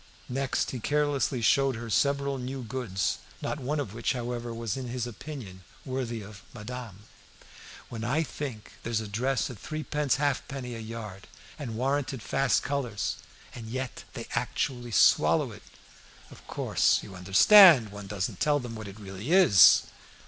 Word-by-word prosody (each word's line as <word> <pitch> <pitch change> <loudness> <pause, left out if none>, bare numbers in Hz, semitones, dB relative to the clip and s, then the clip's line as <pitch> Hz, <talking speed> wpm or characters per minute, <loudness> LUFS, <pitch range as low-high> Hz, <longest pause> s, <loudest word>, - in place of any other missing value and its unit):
Next 135 +1 -1
he 125 - -5
carelessly 145 -2 0
showed 135 +3 +3
her 115 +1 -6
several 140 +3 +1
new 130 +1 -5
goods, 115 -6 -2 0.2
not 150 - -3
one 145 +3 -2
of 115 -9 -4
which, 115 +4 -1
however, 120 -1 -4
was 115 -2 -3
in 130 -2 -5
his 120 0 -3
opinion 115 -6 -8 0.2
worthy 125 -4 -3
of 100 -1 -12
madame. 110 -2 -8 0.8
"When 115 -2 -7
I 140 +7 +1
think 135 -8 -6
that - - -17
there's 115 -1 -1
a 110 - -5
dress 125 +5 -1
at 115 - -11
threepence 150 0 -1
halfpenny 135 -3 -2
a 115 - -6
yard, 110 -4 -8 0.3
and 120 -6 -5
warranted 135 0 -1
fast 135 -1 +1
colours! 125 -7 -2 0.4
And 115 -2 -8
yet 130 +2 -5
they 115 - -6
actually 120 +1 -2
swallow 115 - +4
it! - - -12 0.7
Of - - -15
course - - +1
you - - -10
understand 120 - +7
one 100 -1 -9
doesn't 95 -2 -3
tell 150 -1 +2
them 120 -3 -7
what 110 -2 -7
it 100 +2 -10
really 100 - -6
is!" 175 - +7
125 Hz, 160 wpm, -28 LUFS, 110-135 Hz, 0.8 s, understand